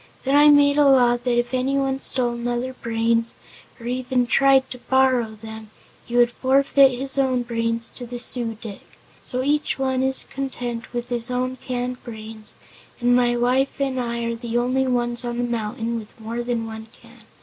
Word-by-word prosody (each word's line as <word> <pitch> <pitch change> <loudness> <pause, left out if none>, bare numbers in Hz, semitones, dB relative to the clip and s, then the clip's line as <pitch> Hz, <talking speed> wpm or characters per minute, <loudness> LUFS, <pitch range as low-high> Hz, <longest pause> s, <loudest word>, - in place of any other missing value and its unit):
Then 270 +1 +1
I 295 +1 +7
made 290 0 +5
a 290 - +5
law 250 -3 +5
that 240 0 -1
if 240 +1 -1
anyone 270 +1 0
stole 245 -3 +1
another's 240 +2 -3
brains, 230 0 0 0.4
or 230 - -11
even 250 0 0
tried 270 +1 +4
to 250 - -7
borrow 255 -4 +1
them, 220 0 -10 0.4
he 240 - -2
would 240 0 +4
forfeit 275 +2 +4
his 270 +1 -3
own 255 -2 +1
brains 230 -1 -1
to 245 - -4
the 245 +1 -6
Su 240 -2 0
dic. 210 -4 -8 0.4
So 255 +1 -4
each 295 +2 0
one 260 -1 0
is 265 0 +4
content 245 -3 -5
with 240 0 -5
his 240 0 +1
own 255 +1 -2
canned 250 0 -4
brains 220 -2 -9 0.4
and 245 0 +3
my 240 -1 +2
wife 255 +4 +1
and 270 -2 -1
I 235 -1 -3
are 230 0 -2
the 235 0 -3
only 255 +2 +1
ones 240 -1 0
on 240 -1 -4
the 245 - -1
mountain 230 0 -3
with 215 +1 -14
more 230 +2 -4
than 240 -1 -2
one 220 0 -8
can. - - -17
245 Hz, 185 wpm, -22 LUFS, 235-260 Hz, 0.4 s, I